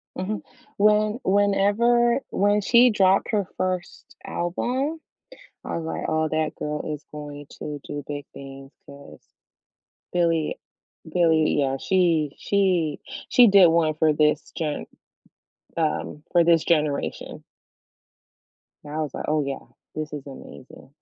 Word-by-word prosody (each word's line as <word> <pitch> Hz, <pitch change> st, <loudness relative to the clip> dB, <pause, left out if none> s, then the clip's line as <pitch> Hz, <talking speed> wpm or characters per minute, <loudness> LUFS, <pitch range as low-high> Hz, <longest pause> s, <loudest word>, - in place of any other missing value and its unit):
Mhm. 200 Hz, +3 st, -3 dB, 0.4 s
When 210 Hz, +2 st, +3 dB
whenever 205 Hz, +5 st, +3 dB
when 205 Hz, +1 st, +2 dB
she 240 Hz, +4 st, +5 dB
dropped 195 Hz, -3 st, +3 dB
her 205 Hz, -3 st, +1 dB
1st 185 Hz, -1 st, -4 dB
album, 255 Hz, -, -2 dB, 0.6 s
I -, -, -4 dB
was, 165 Hz, -, -5 dB
like, 160 Hz, -, -4 dB
"Oh, 155 Hz, 0 st, +1 dB
that 155 Hz, 0 st, -1 dB
girl 150 Hz, 0 st, -3 dB
is 150 Hz, -, -8 dB
going 145 Hz, -1 st, -8 dB
to 150 Hz, -1 st, -5 dB
do 145 Hz, 0 st, -6 dB
big 145 Hz, -1 st, -5 dB
things," 135 Hz, 0 st, -11 dB
'cause 140 Hz, 0 st, -14 dB, 0.9 s
Billie 165 Hz, -3 st, 0 dB, 0.5 s
Billie 160 Hz, -3 st, +3 dB
yeah, 135 Hz, -1 st, 0 dB
she 165 Hz, -3 st, +1 dB
she 180 Hz, -7 st, +1 dB, 0.3 s
she 245 Hz, -1 st, +7 dB
did 195 Hz, -3 st, +7 dB
1 165 Hz, -1 st, +2 dB
for 155 Hz, 0 st, +3 dB
this 150 Hz, 0 st, +1 dB
gen 155 Hz, -3 st, -3 dB, 0.9 s
um, 155 Hz, -2 st, -2 dB
for 175 Hz, -1 st, +5 dB
this 165 Hz, -1 st, +4 dB
generation. 150 Hz, -4 st, -1 dB, 1.4 s
And 150 Hz, 0 st, -9 dB
I 155 Hz, -, -3 dB
was, 150 Hz, -3 st, -3 dB
like, -, -, -5 dB
"Oh, 150 Hz, 0 st, +1 dB
yeah. 140 Hz, -1 st, -5 dB, 0.3 s
This 155 Hz, 0 st, -4 dB
is 145 Hz, -2 st, -6 dB
amazing." 135 Hz, -1 st, -12 dB
165 Hz, 130 wpm, -24 LUFS, 150-200 Hz, 1.4 s, she